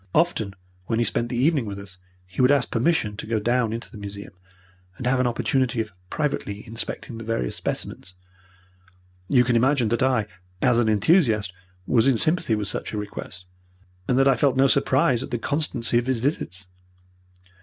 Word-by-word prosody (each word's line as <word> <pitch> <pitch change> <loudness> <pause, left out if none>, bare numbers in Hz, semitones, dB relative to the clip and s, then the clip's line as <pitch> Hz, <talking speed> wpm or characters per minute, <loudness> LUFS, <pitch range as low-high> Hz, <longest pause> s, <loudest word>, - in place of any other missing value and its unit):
Often 110 - +1 0.3
when 115 - 0
he 120 - +2
spent 120 +1 -1
the 120 - -3
evening 140 -2 +2
with 100 -1 -5
us 95 -2 -10 0.3
he 90 +6 -3
would 125 - +5
ask 140 -3 +2
permission 120 -4 +1
to - - -6
go 110 -1 0
down 120 +1 +1
into 115 +1 -6
the 105 - -10
museum 100 0 -8 0.6
and 125 - -6
have 125 +1 +2
an 130 - +2
opportunity 125 +1 0
of 110 -1 -2 0.2
privately 110 -9 -3
inspecting 115 0 -5
the - - -7
various 110 - -2
specimens. 90 0 -5 1.1
You 125 -3 +5
can 120 0 +1
imagine 125 -1 +3
that 120 0 0
I, 130 -5 +2 0.3
as 120 +1 +3
an 115 -2 +2
enthusiast, 110 - +3 0.3
was 120 +4 +3
in 130 -4 +4
sympathy 155 -5 +1
with 105 -2 -3
such 105 - -4
a - - -2
request, 100 -3 -7 0.6
and 125 - +2
that 135 0 +4
I 135 - +5
felt 135 0 +2
no 135 - +5
surprise 130 -2 +3
at - - -6
the 120 - -1
constancy 125 -3 0
of 120 - -5
his 130 -2 +1
visits. 110 - -3
120 Hz, 185 wpm, -24 LUFS, 105-130 Hz, 1.1 s, would